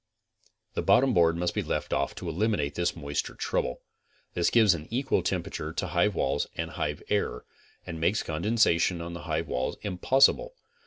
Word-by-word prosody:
The - - -1
botton 125 +7 +4
board 85 -2 +4
must 90 0 -1
be - - 0
left - - -3
off 70 - -1
to 90 - -7
eliminate 85 -4 0
this 85 +2 -1
moisture 75 -3 -3
trou - - 0
ble. 65 - -6 0.5
This 85 -1 +2
gives 110 -5 +5
an 80 -2 -6
equal 130 +3 0
temperature 75 - -3
to 95 - -2
hive 90 +5 +2
walls - - 0
and - - -3
hive - - -3
air, - - -1 0.4
and 80 -2 -6
makes 95 +6 +2
condensation 85 0 +2
on 85 +1 -6
the 85 - -8
hive 80 +1 -1
walls 65 -2 -2
impossible. 135 - +3
85 Hz, 175 wpm, -28 LUFS, 80-105 Hz, 0.5 s, gives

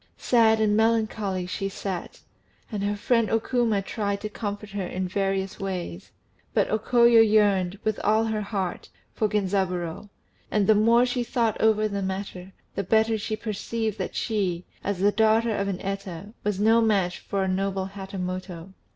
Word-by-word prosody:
Sad 225 -2 +4
and 210 -1 +3
melancholy 215 -4 +1
she 195 +2 -3
sat, 190 -2 -5 0.5
and 205 -2 -3
her 205 +1 0
friend 230 +1 +1
O 225 - +2
Kuma 225 -4 0
tried 200 -1 -2
to 215 - -4
comfort 205 -1 -5
her 195 -2 -3
in 185 +1 -3
various 195 0 -1
ways; 180 - -5 0.5
but - - +3
O 215 - +2
Koyo 235 0 +5
yearned, 205 -4 +3
with 215 -1 -1
all 215 +2 +3
her 220 -1 -1
heart, 195 -3 -3 0.2
for 215 - +1
Genzaburô; 190 -2 -1 0.4
and 210 -2 +2
the 215 - +6
more 230 +3 +4
she 245 0 -1
thought 230 -2 0
over 215 -1 +3
the 200 -1 -3
matter, 190 -1 -5 0.2
the 200 - -2
better 220 +3 +3
she 215 0 -3
perceived 220 0 -3
that - - -4
she, 190 -6 -1 0.2
as 200 -2 -1
the 205 +1 +4
daughter 220 +1 +3
of 200 0 -1
an 190 -2 -2
Eta, 195 0 -5
was 205 -2 -1
no 225 +2 +5
match 195 -5 +1
for 195 -1 -2
a - - -1
noble 190 0 -1
Hatamoto. 185 -2 -6
205 Hz, 170 wpm, -25 LUFS, 190-220 Hz, 0.5 s, the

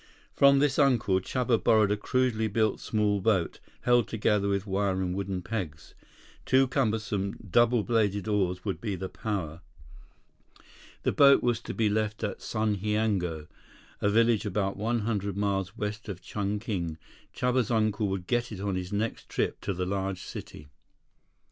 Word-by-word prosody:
From 140 0 +6
this 140 0 +2
uncle, 120 -9 +3
Chuba 120 +3 0
borrowed 110 -2 +4
a - - +3
crudely 115 0 0
built 110 0 +1
small 105 -2 0
boat, 95 -5 +1 0.2
held 120 -3 +3
together 105 -2 +1
with 100 0 0
wire 95 -1 0
and 90 -1 -1
wooden 95 -1 -3
pegs. 85 -9 -5 0.5
Two 130 0 +4
cumbersome, 110 -6 -1
double 120 +3 +3
bladed 105 -4 0
oars 90 -4 0
would 100 - -3
be 105 -5 -3
power. 95 -3 -4 1.4
The - - +2
boat 140 -1 +6
was 120 -2 +1
to - - -7
be 110 -2 +2
left 110 +1 -1
at 105 - -3
Sundhiango, 105 -6 -1 0.6
a 100 - +2
village 115 0 +3
about 100 0 -1
one 115 +3 -1
hundred 100 -3 -2
miles 95 -2 -1
west 105 +1 -4
of 95 -3 -5
Chungking. 100 -5 -3 0.3
Chuba's 125 -2 0
uncle 110 -2 +1
would 95 -2 -3
get 120 +3 -1
it 105 - -6
on 100 0 -2
his 90 0 -4
next 110 +3 -3
trip - - -2
to - - -2
the 90 -1 -2
large 95 -1 -2
city. 75 - -9
105 Hz, 155 wpm, -28 LUFS, 95-115 Hz, 1.4 s, From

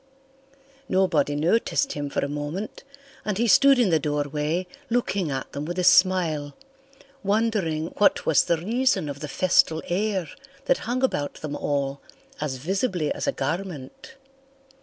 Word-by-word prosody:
Nobody 165 -7 +2
noticed 220 - +1
him 145 -1 -4
for 140 - -1
a - - -3
moment 150 +8 -5 0.4
and 210 -3 -2
he 235 +2 +1
stood 275 +5 +6
in 235 -7 +3
the 160 - +4
doorway 150 +4 -1 0.2
looking 200 -7 0
at 135 -1 -4
them 140 - -5
with 175 +4 -5
a 180 - 0
smile, 170 -6 +3 0.7
wondering 200 -7 0
what 205 - +3
was 160 - +4
the 170 - +2
reason 220 - +1
of 145 -1 -6
the 150 - -5
festal 160 0 +2
air 190 -1 -1 0.4
that - - +2
hung 255 +2 -1
about 145 - 0
them 145 -1 -6
all 140 -1 -2 0.4
as 150 -3 -2
visibly 180 - -1
as - - -4
a - - +3
garment. 160 - -5
170 Hz, 150 wpm, -25 LUFS, 145-200 Hz, 0.7 s, stood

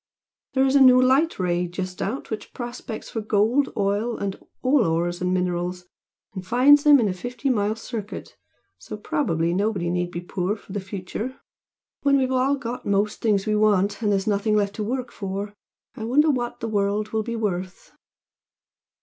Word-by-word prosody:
There 265 0 +4
is 270 +1 +2
a 280 - +6
new 255 -1 +8
Light 265 +6 +3
Ray 180 -1 0
just 180 +1 -5
out 230 +6 -4
which 215 - -6
prospects 240 -2 -6
for 225 - -3
gold, 220 +6 +2
oil 205 +4 0
and 195 -1 -3 0.3
all 260 0 +4
ores 175 +1 -1
and 180 0 0
minerals, 180 0 -1 0.5
and 185 -2 -6
finds 265 +8 +5
them 295 -2 +7
in 225 - +2
a 190 - -1
fifty 245 +8 -3
mile 210 -2 0
circuit 225 -2 -7 0.4
so 215 - -8
probably 195 - 0
nobody 190 -3 0
need 175 0 -1
be 175 0 -5
poor 180 +3 -2
for 205 - -13
the 205 - -1
future. 195 +6 -6 0.6
When 280 -1 +4
we've 260 -1 +1
all 260 +2 +2
got 245 -3 -6
most 205 +1 0
things 205 -4 +2
we 215 -1 +1
want, 205 -1 +2
and 210 -2 +1
there's 195 -1 +1
nothing 210 +1 +1
left 200 -1 +1
to 215 - -2
work 255 +4 -3
for, 200 +1 -5 0.4
I 220 - -6
wonder 295 +6 +4
what 240 -3 -3
the 230 - -2
world 205 0 0
will 220 - -1
be 235 +2 -4
worth!" 190 -4 -4
210 Hz, 185 wpm, -24 LUFS, 190-245 Hz, 0.6 s, new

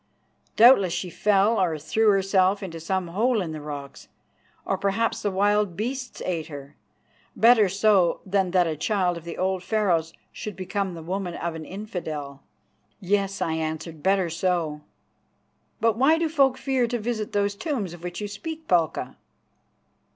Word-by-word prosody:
Doubtless 215 -7 +6
she 180 -1 -3
fell 205 +2 +2
or 165 -4 +1
threw 185 +9 +1
herself 195 0 +2
into 165 -3 -6
some 185 +2 -2
hole 225 +6 +1
in 175 -5 -3
the 155 -1 -6
rocks; 145 -2 -8 0.6
or - - 0
perhaps 200 +4 0
the 205 - 0
wild 205 -1 +1
beasts 255 +4 -4
ate 170 -4 -2
her. 140 -1 -10 0.6
Better 225 -4 +5
so 195 -2 +3
than 190 -1 +1
that 180 0 +3
a 160 -2 -2
child 180 +2 0
of 170 -1 -9
the 170 - -6
old 190 0 0
Pharaohs 180 -6 0 0.2
should 210 -3 -7
become 190 0 -3
the 165 - -8
woman 180 0 -3
of 170 -1 -3
an 160 -1 -7
infidel." 160 -8 -6 0.6
"Yes," 195 0 0
I 160 - -1
answered, 160 0 -4
"better 190 -2 +2
so. 165 -3 -1 1.0
But 225 -1 +2
why 285 +6 +4
do 330 0 +1
folk 275 -4 +3
fear 260 -2 0
to 240 +1 -2
visit 220 -1 -3
those 205 0 +1
tombs 210 - -3
of 175 - -11
which 175 0 -5
you 210 - -3
speak, 315 +11 -7
Palka?" 170 -3 0
190 Hz, 165 wpm, -25 LUFS, 170-215 Hz, 1.0 s, Doubtless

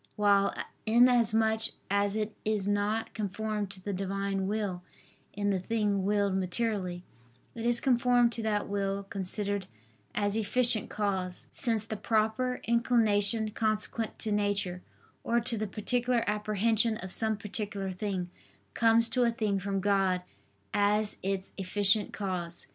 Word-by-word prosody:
While, 200 -2 +3 0.3
inasmuch 225 -2 +4 0.3
as 200 0 +1
it 215 0 -2
is 210 -2 -1
not 205 +2 0
conformed 210 0 -3
to 195 -1 -11
the 205 - -3
Divine 195 0 -2
will 200 -4 -2 0.5
in 205 0 0
the 190 - 0
thing 205 0 0
willed 200 -1 +1
materially, 185 -2 -2 0.5
it 230 0 -3
is 240 0 +3
conformed 245 -2 +3
to 230 - -5
that 210 -2 -1
will 200 0 -2
considered 200 0 -3 0.5
as 205 -1 0
efficient 225 +1 +1
cause; 190 -3 -2
since 225 -5 +2
the 220 -1 -5
proper 225 +4 0
inclination 225 -2 +3
consequent 215 +1 -2
to 220 - -4
nature, 205 -3 -1 0.4
or 235 +1 +2
to 235 0 0
the 215 0 -2
particular 240 +4 0
apprehension 215 +2 +1
of 185 -1 -8
some 220 -1 +2
particular 205 -1 -4
thing, 185 -2 -3 0.4
comes 230 0 +4
to 255 - 0
a 240 - +4
thing 215 -4 -1
from 195 0 -2
God 190 -2 +1 0.5
as 205 +1 +2
its 195 0 -3
efficient 200 +2 +3
cause. 180 -4 -4
210 Hz, 135 wpm, -29 LUFS, 195-225 Hz, 0.5 s, inasmuch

